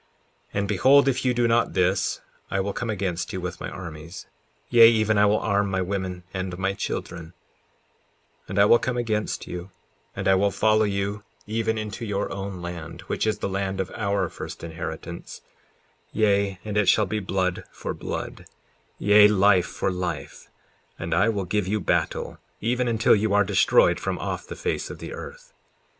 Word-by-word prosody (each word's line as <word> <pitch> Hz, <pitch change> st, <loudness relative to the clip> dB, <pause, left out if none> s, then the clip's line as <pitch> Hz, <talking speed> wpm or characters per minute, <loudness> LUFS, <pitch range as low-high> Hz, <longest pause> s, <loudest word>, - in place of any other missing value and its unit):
54:12 -, -, -1 dB
And 100 Hz, -, -1 dB
behold, 140 Hz, +6 st, +5 dB
if 135 Hz, -, +1 dB
you 125 Hz, -, +3 dB
do 120 Hz, -1 st, +3 dB
not 115 Hz, +1 st, +2 dB
this, 90 Hz, +1 st, +1 dB, 0.3 s
I 95 Hz, -, -1 dB
will 100 Hz, +1 st, -1 dB
come 120 Hz, -, -3 dB
against 95 Hz, -5 st, -2 dB
you 95 Hz, -, -3 dB
with 90 Hz, 0 st, -5 dB
my -, -, -5 dB
armies; 85 Hz, -1 st, -8 dB, 0.4 s
yea, 115 Hz, -2 st, +8 dB
even 110 Hz, -1 st, +2 dB
I 105 Hz, -, +5 dB
will 105 Hz, +1 st, +3 dB
arm 100 Hz, -2 st, +1 dB
my 95 Hz, -1 st, 0 dB
women 90 Hz, -1 st, -3 dB
and 95 Hz, -1 st, -4 dB
my 95 Hz, +1 st, 0 dB
children, 85 Hz, -3 st, -5 dB, 1.1 s
and 95 Hz, -, -5 dB
I 100 Hz, -, +6 dB
will 120 Hz, +3 st, +6 dB
come 125 Hz, -1 st, -2 dB
against 110 Hz, -3 st, -2 dB
you, 90 Hz, +1 st, -7 dB, 0.5 s
and -, -, -3 dB
I 95 Hz, -, +6 dB
will 100 Hz, +2 st, +3 dB
follow 110 Hz, +2 st, +3 dB
you 100 Hz, +1 st, -2 dB, 0.2 s
even 110 Hz, +1 st, -1 dB
into 110 Hz, +1 st, -5 dB
your 105 Hz, -3 st, -2 dB
own 95 Hz, -2 st, -5 dB
land, 85 Hz, -2 st, -7 dB
which -, -, -2 dB
is 105 Hz, -2 st, +1 dB
the -, -, -3 dB
land 95 Hz, 0 st, -2 dB
of 95 Hz, -1 st, -2 dB
our 100 Hz, -3 st, -1 dB
first -, -, -8 dB
inheritance; 85 Hz, +1 st, -7 dB, 0.7 s
yea, 100 Hz, -3 st, +2 dB
and 105 Hz, -1 st, -2 dB
it 105 Hz, -3 st, +4 dB
shall 105 Hz, -, +4 dB
be 105 Hz, +3 st, -2 dB
blood 95 Hz, -2 st, -1 dB
for -, -, -5 dB
blood, -, -, -6 dB, 0.5 s
yea, 105 Hz, 0 st, +7 dB
life 100 Hz, -3 st, +4 dB
for -, -, -2 dB
life; 90 Hz, 0 st, -5 dB, 0.5 s
and 85 Hz, 0 st, -3 dB
I 95 Hz, +7 st, +3 dB
will 100 Hz, -4 st, -1 dB
give 100 Hz, +1 st, -1 dB
you 105 Hz, +2 st, 0 dB
battle -, -, -1 dB, 0.2 s
even 125 Hz, +3 st, 0 dB
until 115 Hz, -1 st, +4 dB
you 105 Hz, -1 st, +1 dB
are 105 Hz, -, +5 dB
destroyed -, -, +4 dB
from -, -, -2 dB
off -, -, -4 dB
the -, -, -7 dB
face -, -, -2 dB
of -, -, -7 dB
the -, -, -7 dB
earth. -, -, -10 dB
100 Hz, 185 wpm, -25 LUFS, 95-110 Hz, 1.1 s, yea